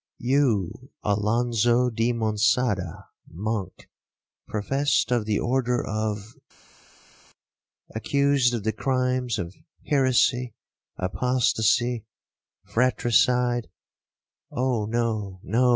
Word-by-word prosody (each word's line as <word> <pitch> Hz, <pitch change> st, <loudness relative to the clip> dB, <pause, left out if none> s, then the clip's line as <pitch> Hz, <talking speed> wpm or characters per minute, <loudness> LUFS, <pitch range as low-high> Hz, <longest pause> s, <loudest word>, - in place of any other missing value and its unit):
—'You, 125 Hz, -3 st, 0 dB
Alonzo 120 Hz, +3 st, +2 dB
di 115 Hz, +2 st, +1 dB
Monçada, 105 Hz, -4 st, 0 dB, 0.3 s
monk, 100 Hz, +1 st, -4 dB, 0.6 s
professed 135 Hz, +6 st, 0 dB
of 120 Hz, -3 st, +1 dB
the 105 Hz, -1 st, 0 dB
order 125 Hz, -1 st, 0 dB
of 110 Hz, 0 st, -3 dB, 0.7 s
———, -, -, -29 dB
accused 140 Hz, +1 st, +2 dB
of 110 Hz, -, -4 dB
the 110 Hz, +1 st, 0 dB
crimes 125 Hz, -2 st, 0 dB
of 85 Hz, -2 st, -5 dB, 0.3 s
heresy, 130 Hz, -3 st, +2 dB, 0.4 s
apostacy, 115 Hz, +2 st, +1 dB, 0.6 s
fratricide, 120 Hz, 0 st, +2 dB, 0.8 s
('Oh 125 Hz, -4 st, 0 dB
no,—no!' 110 Hz, 0 st, 0 dB
120 Hz, 80 wpm, -25 LUFS, 105-125 Hz, 0.8 s, Alonzo